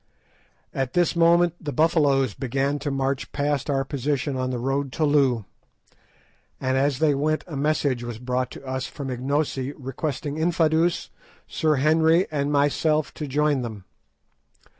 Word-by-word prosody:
At 135 -2 -2
this 175 0 +2
moment 170 0 +4
the 150 -3 -4
Buffaloes 145 - +2
began 135 +3 -1
to 145 +1 -3
march 135 0 -2
past 145 -1 -1
our 135 -1 +1
position 140 +1 -2
on 130 0 -1
the 125 - -2
road 135 +2 -1
to 155 - +1
Loo, 135 -7 +2 1.1
and 130 0 0
as 135 0 +1
they 150 0 +3
went 155 +3 0
a 165 - -8
message 140 -3 0
was 120 -2 -5
brought 125 +1 -2
to - - -11
us 130 0 -3
from 140 -3 -6
Ignosi 135 +1 -1
requesting 140 +2 -4
Infadoos, 165 0 +1 0.4
Sir 155 -1 +1
Henry, 160 +5 +3
and 145 -1 -1
myself 150 +2 +1
to 150 - -5
join 145 0 +1
them. 110 -5 -6
140 Hz, 150 wpm, -24 LUFS, 130-155 Hz, 1.1 s, moment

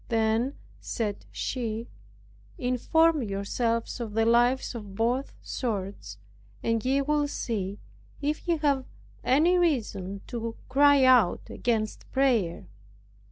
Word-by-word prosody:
Then, 225 +3 +1 0.2
said 210 -3 -4
she, 230 -2 -3 0.7
"Inform 305 +6 +2
yourselves 230 +3 -2
of 225 -3 -5
the 225 0 +3
lives 240 +3 +3
of 205 -5 -8
both 240 +5 0
sorts, 195 - -4 0.5
and 230 -1 0
ye 275 +2 +2
will 295 0 +1
see 205 -8 -3 0.4
if 300 +4 -2
ye 340 -1 +2
have 280 -4 +1 0.4
any 330 +7 +4
reason 210 - -1
to 230 -1 -4
cry 285 0 +5
out 250 -8 +4
against 220 -3 -2
prayer." 240 - +1
235 Hz, 115 wpm, -27 LUFS, 220-275 Hz, 0.7 s, cry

